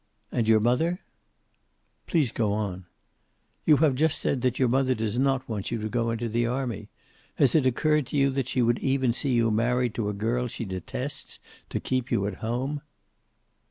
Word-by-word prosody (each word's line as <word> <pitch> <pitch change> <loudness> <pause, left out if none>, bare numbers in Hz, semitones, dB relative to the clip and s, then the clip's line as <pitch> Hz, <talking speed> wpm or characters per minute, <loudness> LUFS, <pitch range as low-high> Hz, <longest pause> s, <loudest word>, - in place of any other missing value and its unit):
"And 115 -3 0
your 110 -1 +6
mother?" 160 - +1 1.1
"Please 150 -9 +2
go 110 -4 0
on." 95 -4 -3 0.8
"You 150 - +7
have 145 - +3
just 155 +4 +2
said 130 - -1
that 125 0 +1
your 130 - +3
mother 130 +1 +2
does 110 +1 -1
not 135 -1 +1
want 105 -4 -3
you 115 - -2
to 110 0 -3
go 115 0 0
into 115 +1 -2
the 115 +1 0
army. 125 -3 -3 0.5
Has 135 - +3
it 150 -5 +4
occurred 150 +2 +2
to - - -3
you 140 -1 +3
she 125 0 0
would 120 +1 +2
even 130 -3 +1
see 135 +2 0
you 115 -2 +3
married 120 +2 +1
to 105 -3 -2
a - - -2
girl 115 +5 -1
she 115 - -5
detests, 95 -2 -5 0.3
to - - -2
keep 130 0 -2
you 100 - +1
at 100 -2 -4
home?" 130 +6 -2
120 Hz, 190 wpm, -26 LUFS, 110-135 Hz, 1.1 s, You